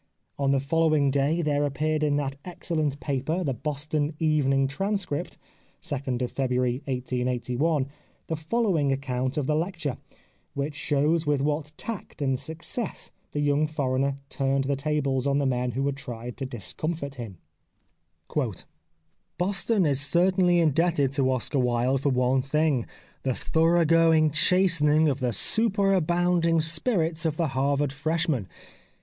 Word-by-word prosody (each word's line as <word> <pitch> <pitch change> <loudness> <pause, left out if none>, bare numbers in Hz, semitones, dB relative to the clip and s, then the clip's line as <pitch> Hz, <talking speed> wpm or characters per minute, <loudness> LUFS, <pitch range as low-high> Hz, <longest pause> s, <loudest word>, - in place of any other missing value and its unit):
On 140 -1 +1
the 135 0 +3
following 155 0 +2
day 145 +5 +1
there 145 -1 +1
appeared 155 +2 0
in 150 -1 +2
that 140 -2 -1
excellent 155 -5 -2
paper. 145 +6 -1
The 140 -5 0
Boston 150 +3 -2
Evening 140 -4 +2
Transcript 195 0 -2 0.4
(2nd 130 -3 -3
February 125 -1 -1
1881) 125 +3 -1 0.4
the 160 - -2
following 160 -3 +1
account 130 -1 -2
of 145 - 0
the 150 - +1
lecture, 165 -4 -2 0.6
which 140 +2 -2
shows 150 +2 +1
with 145 -1 +2
what 150 +2 -1
tact 225 -7 -6
and 135 -3 0
success 160 - -5 0.2
the 145 - -2
young 145 +1 +2
foreigner 140 -2 -1
turned 135 -1 0
the 140 +1 0
tables 140 -2 0
on 140 0 +2
the 140 - +1
men 125 -2 0
who 135 +3 -1
had 140 -1 -1
tried 120 -2 -7
to 135 0 -4
discomfit 140 - -4
him: 105 -6 -8 0.5
— - - -6
" 80 +4 -47
Boston 195 +2 +1
is 140 -2 +2
certainly 175 +3 +3
indebted 160 -3 +2
to 135 -1 +1
Oscar 130 +2 0
Wilde 125 +2 +1
for 140 - +1
one 130 0 +2
thing 145 -2 +1 0.2
— - - -32
the 130 -2 -1
thorough 165 +1 +2
going 160 -1 +4
chastening 155 -1 +3
of 140 -2 0
the 125 -2 0
superabounding 175 - +2
spirits 165 0 0
of 160 -2 -1
the 165 -3 +1
Harvard 140 +1 0
fresh 160 +4 -1
man. 125 - -1
145 Hz, 145 wpm, -26 LUFS, 135-160 Hz, 0.6 s, going